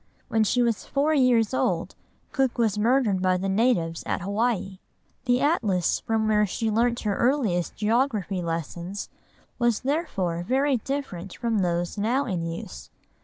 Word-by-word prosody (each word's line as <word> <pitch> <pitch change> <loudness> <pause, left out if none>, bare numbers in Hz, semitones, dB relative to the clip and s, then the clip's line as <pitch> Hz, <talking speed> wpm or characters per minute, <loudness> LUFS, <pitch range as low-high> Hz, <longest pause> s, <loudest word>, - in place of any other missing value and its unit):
When 220 -1 +2
she 245 +3 +2
was 230 -3 0
four 290 +2 +1
years 250 -5 +3
old, - - 0 0.4
Cook 265 -3 0
was 225 -4 +2
murdered 220 -3 +2
by 185 0 +2
the 190 +2 -2
natives 190 -6 +1
at - - -1
Hawaii. 200 -1 -1 0.5
The 245 +1 +2
atlas 215 - +1
from 220 -1 0
which 210 -2 +3
she 225 +3 -1
learnt 235 +2 +1
her 205 -2 -1
earliest 235 - +1
geography 215 -4 0
lessons 170 +3 -4 0.5
was 240 -3 +2
therefore 255 - -1
very 265 +7 +1
different 215 -8 -5
from 230 -3 0
those 175 +1 -1
now 245 +7 +1
in 175 -7 -2
use. 70 - -7
220 Hz, 150 wpm, -25 LUFS, 185-250 Hz, 0.5 s, years